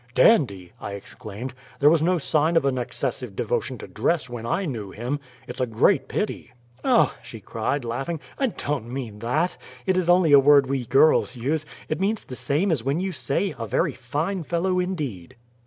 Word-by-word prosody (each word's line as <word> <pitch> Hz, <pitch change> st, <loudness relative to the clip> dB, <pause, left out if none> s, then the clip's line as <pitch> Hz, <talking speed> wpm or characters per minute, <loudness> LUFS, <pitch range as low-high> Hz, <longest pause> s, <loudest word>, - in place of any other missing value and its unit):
"Dandy!" 100 Hz, -, +4 dB
I 100 Hz, -, -5 dB
exclaimed. 105 Hz, +4 st, -7 dB, 0.3 s
"There 145 Hz, +2 st, +6 dB
was 165 Hz, -2 st, +3 dB
no 180 Hz, +3 st, +3 dB
sign 160 Hz, +1 st, +2 dB
of 150 Hz, -, +2 dB
an 130 Hz, -2 st, +1 dB
excessive 125 Hz, -2 st, -3 dB
devotion 120 Hz, +2 st, -1 dB
to -, -, -9 dB
dress 125 Hz, -, 0 dB
when 115 Hz, -1 st, -5 dB
I 195 Hz, +10 st, 0 dB
knew 115 Hz, -, -4 dB
him. 120 Hz, +8 st, -3 dB, 0.3 s
It's 125 Hz, +2 st, -7 dB
a 125 Hz, -, +1 dB
great 110 Hz, -1 st, +3 dB
pity!" 125 Hz, -, -3 dB, 0.3 s
"Oh!" -, -, +4 dB
she -, -, -9 dB
cried, 140 Hz, -3 st, -2 dB
laughing, 135 Hz, +8 st, -3 dB, 0.2 s
"I 270 Hz, -, +3 dB
don't 145 Hz, -, -3 dB
mean 120 Hz, -6 st, -5 dB
THAT. 150 Hz, +11 st, 0 dB, 0.3 s
It 190 Hz, -1 st, +2 dB
is 180 Hz, -2 st, +1 dB
only 175 Hz, -3 st, +5 dB
a 140 Hz, -, +9 dB
word 140 Hz, 0 st, +6 dB
we 130 Hz, -2 st, -2 dB
girls 135 Hz, 0 st, +4 dB
use; 150 Hz, +6 st, -1 dB, 0.2 s
it 155 Hz, -, -2 dB
means 210 Hz, +2 st, 0 dB
the 130 Hz, -, -7 dB
same 155 Hz, +10 st, +1 dB
as 140 Hz, -8 st, 0 dB
when 140 Hz, +5 st, 0 dB
you 190 Hz, +1 st, -1 dB
say, 145 Hz, +5 st, -1 dB
'A 115 Hz, -, -5 dB
VERY -, -, +1 dB
FINE 150 Hz, +10 st, -2 dB
FELLOW 180 Hz, +3 st, 0 dB
INDEED."' 150 Hz, -, -3 dB
135 Hz, 190 wpm, -24 LUFS, 120-165 Hz, 0.3 s, a